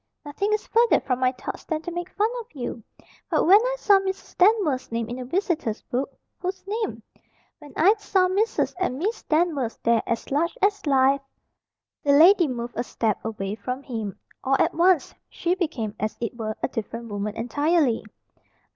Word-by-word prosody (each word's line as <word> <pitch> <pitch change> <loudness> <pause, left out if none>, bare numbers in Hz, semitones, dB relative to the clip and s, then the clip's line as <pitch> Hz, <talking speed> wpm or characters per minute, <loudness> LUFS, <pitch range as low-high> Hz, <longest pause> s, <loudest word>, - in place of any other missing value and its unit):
"Nothing 395 +8 -2
is 425 - 0
further 470 +1 +4
from 255 -1 -1
my 255 -1 +3
thoughts 255 - -7
than 315 -1 -3
to 350 - -5
make 350 +1 -4
fun 425 +3 0
of 460 - -8
you. 245 -3 -5 0.5
But - - +2
when 395 +5 +7
I - - 0
saw 405 -5 +5
Mrs. 385 0 -5
Danvers' 360 - +3
name 230 -1 -2
in 240 +2 -5
the 255 - -6
visitors' 320 - -1
book 260 +3 -2 0.2
" - - -54
"Whose 375 +1 -4
name?" 430 +2 -3 0.6
"When 295 -2 -13
I 370 +7 +6
saw 380 -3 +2
Mrs. 405 +5 0
and 315 -9 -1
Miss 410 +10 -2
Danvers 305 -7 0
there 230 -1 +3
as 230 +3 -3
large 335 - 0
as 405 -5 +1
life 270 0 +4 0.4
" - - -66
The 285 - +4
lady 345 +4 +7
moved 240 -2 -5
a - - +1
step 225 -3 -2
away 205 -3 -4
from 250 +6 -5
him. 220 -7 -5 0.3
All 270 +1 +2
at - - +2
once 345 -3 +3 0.2
she 350 0 -1
became, 300 - -2
as 215 0 -2
it 235 0 -3
were, 215 -2 -4
a - - +3
different 230 -1 -6
woman 205 +1 -3
entirely. 285 +2 +1
290 Hz, 190 wpm, -24 LUFS, 235-375 Hz, 0.6 s, when